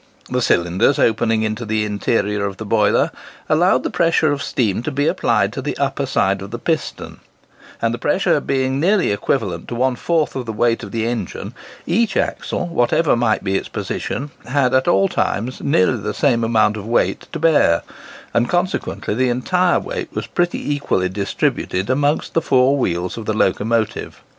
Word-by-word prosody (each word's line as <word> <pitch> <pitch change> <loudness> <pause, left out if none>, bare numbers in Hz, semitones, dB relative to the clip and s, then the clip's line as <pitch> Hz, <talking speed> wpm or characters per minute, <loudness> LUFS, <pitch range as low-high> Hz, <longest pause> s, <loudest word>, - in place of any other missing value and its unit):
The - - 0
cylinders 90 +10 +2
opening 115 0 +2
into 110 +2 -2
the 110 -1 -1
interior 105 0 0
of 100 -1 -7
the 110 - -6
boiler, 105 -1 +2 0.4
allowed 175 +4 +3
the - - -2
pressure 165 -2 +2
of 145 -1 -2
steam 110 -7 0
to 125 - -3
be 145 0 -1
applied - - +1
to - - -4
the - - -4
upper - - -1
side 95 0 +1
of 100 - -7
the 120 - -5
piston; 160 +6 -3 0.6
and - - +2
the - - -4
pressure - - +2
being 130 0 -1
nearly 185 - +2
equivalent 100 -4 -2
to 120 - -5
one 130 +1 +1
fourth 160 +4 0
of 130 -3 -4
the 110 - -3
weight 115 +2 +1
of 105 - -7
the 115 +1 -1
engine, 115 -6 -4 0.3
each 220 +6 +1
axle, - - -1
whatever 160 -2 +2
might 120 -2 +1
be 95 -1 -1
its - - -2
position, 145 +3 -4 0.2
had 130 -1 +1
at 130 0 +2
all 95 0 +4
times 120 +7 -2
nearly 120 -3 +2
the 105 +1 -3
same 120 -5 +2
amount 110 -2 +2
of 105 0 -7
weight 120 - 0
to - - -4
bear, 150 - +3 0.5
and 120 +1 +1
consequently 180 - -1
the 130 +3 +1
entire 175 +9 +2
weight - - -5
was - - -2
pretty 175 -4 -1
equally 95 -10 0
distributed 100 +1 -1
amongst 145 +3 0
the 165 - +2
four 135 -2 +3
wheels 90 -6 -2
of 110 - -8
the 110 - +1
locomotive. 110 +3 -1
120 Hz, 180 wpm, -19 LUFS, 105-145 Hz, 0.6 s, all